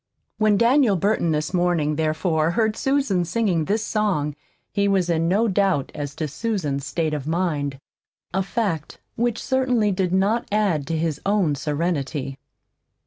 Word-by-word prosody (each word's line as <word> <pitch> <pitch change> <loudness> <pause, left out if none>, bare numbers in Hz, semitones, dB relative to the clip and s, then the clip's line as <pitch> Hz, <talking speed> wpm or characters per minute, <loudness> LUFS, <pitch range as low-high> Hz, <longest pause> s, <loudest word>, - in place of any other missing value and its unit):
When 215 -1 +4
Daniel 235 -1 +4
Burton, 195 -1 +1
this 155 +3 -1
morning, 175 -4 +1
therefore, 160 +1 +1
heard 220 +4 +1
Susan 270 -11 +1
singing 175 -3 0
this 215 +4 0
song, 185 -10 0 0.4
he 200 0 +1
was 190 -3 +2
in 165 0 +1
no 205 +6 +2
doubt 190 -8 +1
as 145 -1 -5
to 155 - -2
Susan's 150 - -2
state 160 -2 -1
of 145 -1 -4
mind 155 -5 -1 0.6
a 190 - +1
fact 190 - -2 0.2
which 235 0 0
certainly 255 -5 +1
did 185 -2 0
not 200 +5 +1
add 195 -9 +1
to 165 - -1
his 155 -2 -2
own 195 -6 +2
serenity. 145 -2 -2
180 Hz, 150 wpm, -23 LUFS, 155-210 Hz, 0.6 s, When